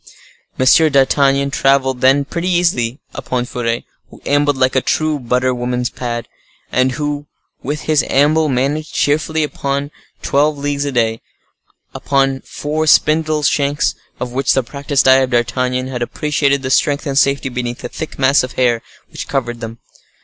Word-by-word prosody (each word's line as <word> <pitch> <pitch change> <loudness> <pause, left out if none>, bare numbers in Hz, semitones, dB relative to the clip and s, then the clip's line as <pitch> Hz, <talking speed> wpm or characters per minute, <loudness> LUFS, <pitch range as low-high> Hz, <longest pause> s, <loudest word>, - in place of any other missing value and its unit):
Monsieur 140 +5 +5
d'Artagnan 140 0 +2
traveled, 130 -2 +1
then, 135 +2 +4
pretty 170 +4 -3
easily 165 -8 +1
upon 125 -1 -3
Furet, 120 -1 -3 0.3
who - - -15
ambled 145 -1 +2
like 130 0 +1
a 130 - +3
true 155 +1 0
butter 125 +1 0
woman's 125 0 -2
pad, 120 -2 -4 0.4
and 130 +1 +2
who, 145 +1 -3 0.3
with 150 +3 -4
his 155 -5 +1
amble, 150 +3 +3
managed 140 +4 -1
cheerfully 155 +2 +1
about 140 -1 -3 0.3
twelve 145 +2 +1
leagues 145 0 -2
a 140 - -2
day, 115 -3 0 0.7
upon 135 -1 0
four 155 +2 -3
spindle 155 0 +3
shanks, 145 0 +1 0.3
of 125 -1 -4
which 130 +1 +1
the 135 - +1
practiced 140 +2 -1
eye 130 0 +7
of 130 -1 +1
D'Artagnan 125 +1 0
had 130 -2 -5
appreciated 140 +2 0
the 130 - -2
strength 145 +2 +1
and 140 -2 -2
safety 140 0 +2
beneath 120 -1 -4
the - - -3
thick 160 - -7
mass 135 +1 +4
of 130 - -5
hair 120 -3 +1 0.3
which - - -7
covered 120 -4 -2
them. 115 0 -7
135 Hz, 160 wpm, -17 LUFS, 125-145 Hz, 0.7 s, eye